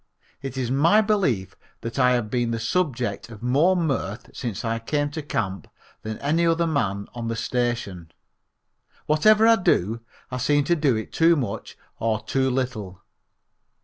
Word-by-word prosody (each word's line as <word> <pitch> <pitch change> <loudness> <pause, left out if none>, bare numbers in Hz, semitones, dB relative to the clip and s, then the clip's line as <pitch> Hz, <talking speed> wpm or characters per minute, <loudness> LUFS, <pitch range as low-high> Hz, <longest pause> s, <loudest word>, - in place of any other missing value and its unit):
It 135 -1 -6
is 125 -2 -1
my 165 +10 +4
belief 185 - 0 0.3
that 115 +2 -5
I 125 -1 +5
have 115 -4 -1
been 120 -2 0
the 115 0 -2
subject 125 -3 -1
of 110 -1 -11
more 145 +10 +3
mirth 120 - -2
since 115 -3 -4
I 115 0 -1
came 145 +5 -1
to 155 - -4
camp 100 -9 -3 0.3
than 110 0 -5
any 155 +4 +1
other 165 0 +2
man 100 -11 -1
on 120 -1 -5
the 115 - -2
station. 115 -9 -2 0.9
Whatever 215 +9 +5
I 230 0 +6
do 115 - +1 0.3
I 125 - -2
seem 145 +3 +2
to 170 +5 +2
do 145 -6 +2
it 110 - -5
too 165 +1 +5
much 135 -6 -4 0.2
or 110 -1 0
too 130 -1 0
little. 110 -8 -3
125 Hz, 165 wpm, -24 LUFS, 115-155 Hz, 0.9 s, I